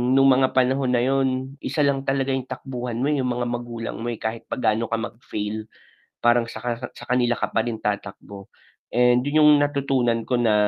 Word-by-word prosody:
nung 135 0 +6
mga 130 0 +2
panahon 130 0 +2
na 120 - +2
yun, 135 +1 0
isa 140 +3 0
lang 140 -1 +1
talaga 135 0 +1
yung 130 -1 -3
takbuhan 125 -2 -5
mo, 125 - 0
yung 135 -4 0
mga 120 0 -1
magulang 120 -1 -5
mo, 120 - -3
eh, 120 - -2
kahit 110 +1 -5
pa - - -2
gaano 115 -2 +1
ka 115 - 0
mag-fail, 110 -2 -5 0.6
parang 120 0 +4
saka 120 0 -4 0.2
sa - - -10
kanila 120 -1 +3
ka - - -2
pa 115 - +2
rin 115 -2 -2
tatakbo. 100 -1 -5 0.5
And, 125 0 +4
yun 155 +2 +3
yung 150 - +8
natutunan 135 -5 +1
ko 125 - 0
na, 110 -3 +3
125 Hz, 195 wpm, -23 LUFS, 115-135 Hz, 0.6 s, yung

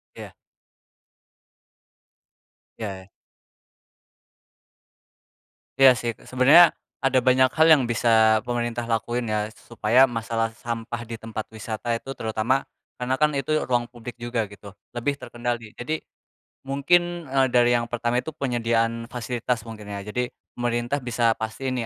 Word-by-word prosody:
Iya. - - -10 2.4
Iya. 95 -3 -6 2.7
Iya 135 -1 +9
sih. 120 - -1 0.2
Sebenarnya, 145 +7 +7 0.3
ada 130 -1 +4
banyak 130 +1 +4
hal 160 0 +5
yang 145 -5 +7
bisa 115 -2 +4
pemerintah 120 -1 -3
lakuin 120 +1 -1
ya, 105 0 -1
supaya 120 +3 +2
masalah 115 -1 -1
sampah 120 0 -5
di 115 0 -6
tempat 110 -1 -5
wisata 110 +2 -4
itu 135 +4 -5
terutama 110 +4 0 0.3
karena 125 +1 -1
kan 150 - +5
itu 135 +3 -1 0.2
ruang 120 -1 +2
publik 120 0 -10
juga 120 -3 -2
gitu, 100 -1 -12 0.2
lebih 130 +4 0
terkendali. 120 -2 -4
Jadi, 155 +6 -3
eee, - - -50 0.4
mungkin 170 +5 +1 0.2
dari 120 -1 +4
yang 120 -1 0
pertama 120 +1 0
itu - - -6
penyediaan 115 -4 -1
fasilitas 120 -1 -3
mungkin 110 -2 -9
ya, 100 -1 -6
jadi, 125 +4 -2 0.2
pemerintah 120 +3 -1
bisa 120 -2 +1
pastiin 125 +4 -3
nih - - -3
120 Hz, 125 wpm, -24 LUFS, 115-125 Hz, 2.7 s, Iya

